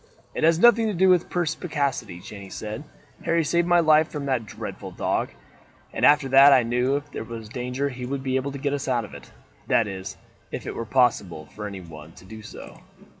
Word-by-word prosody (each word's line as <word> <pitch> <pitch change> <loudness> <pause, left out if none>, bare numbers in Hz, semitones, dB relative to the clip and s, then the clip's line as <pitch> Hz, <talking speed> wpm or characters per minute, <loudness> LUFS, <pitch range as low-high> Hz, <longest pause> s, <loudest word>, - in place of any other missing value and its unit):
"It - - -3
has 165 0 +5
nothing 230 +3 +5
to 210 - -2
do 190 +2 +4
with 180 -2 +3
perspicacity," 145 - -2
Jeanne 100 0 -10
said. 110 +8 -6 0.4
"Harry 165 0 +2
saved 170 +3 +1
my 175 0 +5
life 155 -1 +4
from 145 -2 -5
that 130 -5 -1
dreadful - - -7
dog, - - -1 0.6
and - - -4
after 145 -2 +5
that 135 +2 +8
I 130 -3 +6
knew 125 +3 +1
if 145 0 -5
there - - -5
was 115 -1 -8
danger 125 +3 -3
he 125 -2 -7
would 135 0 -4
be 130 -1 -1
able 130 +2 -1
to 140 - -6
get 140 +1 -2
us 140 -1 -3
out 120 -4 0
of - - -14
it. - - -11 0.4
That 115 - +3
is, 95 -1 -7 0.3
if - - -6
it - - -4
were 115 - -5
possible 105 -11 +1
for 105 0 -5
anyone 85 -5 -10
to - - -16
do 110 +3 -10
so." 105 - -11
130 Hz, 215 wpm, -24 LUFS, 110-150 Hz, 0.6 s, that